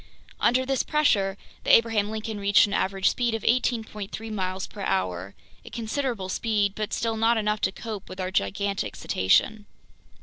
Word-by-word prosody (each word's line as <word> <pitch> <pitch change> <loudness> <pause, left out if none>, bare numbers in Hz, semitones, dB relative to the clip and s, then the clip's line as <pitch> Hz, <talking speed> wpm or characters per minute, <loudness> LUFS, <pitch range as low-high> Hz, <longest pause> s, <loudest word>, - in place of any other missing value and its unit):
Under 255 +2 +3
this 270 0 +1
pressure 205 -11 +1 0.3
the - - -3
Abraham 225 -3 +2
Lincoln 220 -1 -4
reached 200 0 +5
an 200 - -5
average 195 -1 +1
speed 240 -2 +1
of 225 - -5
18.3 225 -3 -1
miles 185 -2 -2
per 205 - -10
hour, 95 - -2 0.3
a - - -11
considerable 230 -3 -3
speed 205 0 0
but 215 0 -4
still 225 -1 -1
not 225 +1 +3
enough 210 -1 0
to - - +1
cope 215 -1 -7
with 185 - -9
our 185 0 -2
gigantic 190 - -1
cetacean. 205 - +1
210 Hz, 165 wpm, -26 LUFS, 190-225 Hz, 0.3 s, reached